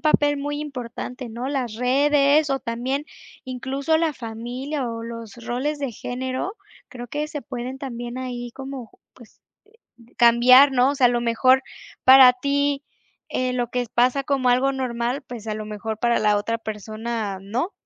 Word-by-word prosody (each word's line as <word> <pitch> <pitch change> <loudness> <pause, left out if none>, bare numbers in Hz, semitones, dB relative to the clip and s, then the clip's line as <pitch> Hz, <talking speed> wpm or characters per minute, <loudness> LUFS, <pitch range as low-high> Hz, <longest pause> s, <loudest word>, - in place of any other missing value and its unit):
papel 290 -2 +3
muy 290 +1 -3
importante, 250 -2 -6
¿no?, 240 +4 -5
las 255 -6 -2
redes, 280 +4 +3
o 270 -1 0
también, 255 +5 -2 0.4
incluso, 270 +5 -1
la 325 -2 +1
familia 245 +4 -5
o 230 0 -5
los 230 -2 -8
roles 285 +5 -2
de 275 - -2
género. 255 - -4 0.3
Creo 245 -4 -9
que 295 +3 -2
se 300 -2 -6
pueden 255 -1 -6
también 240 -2 -6
ahí 245 -2 -5
como, 265 -3 -8 0.2
pues, 235 -3 -18 0.8
cambiar, 250 +4 +7
¿no? 255 0 +3
O 285 - -1
sea, 260 -3 +3
a - - +6
lo 240 -1 0
mejor 255 +3 +4 0.4
para 260 -1 +9
ti, 280 +2 0 0.5
eh, 255 0 -1
lo 245 -2 -1
que 250 0 -1
es 240 - -6
pasa 250 +3 +2
como 270 -3 +1
algo 260 +2 +3
normal, 250 0 -2
pues, 240 -5 -9
a 215 - -1
lo 215 0 -5
mejor 215 +1 -5
para 235 -1 +2
la 210 -1 +3
otra 230 +3 -1
persona, 215 -1 -4
no. 230 - -3
250 Hz, 170 wpm, -23 LUFS, 235-275 Hz, 0.8 s, para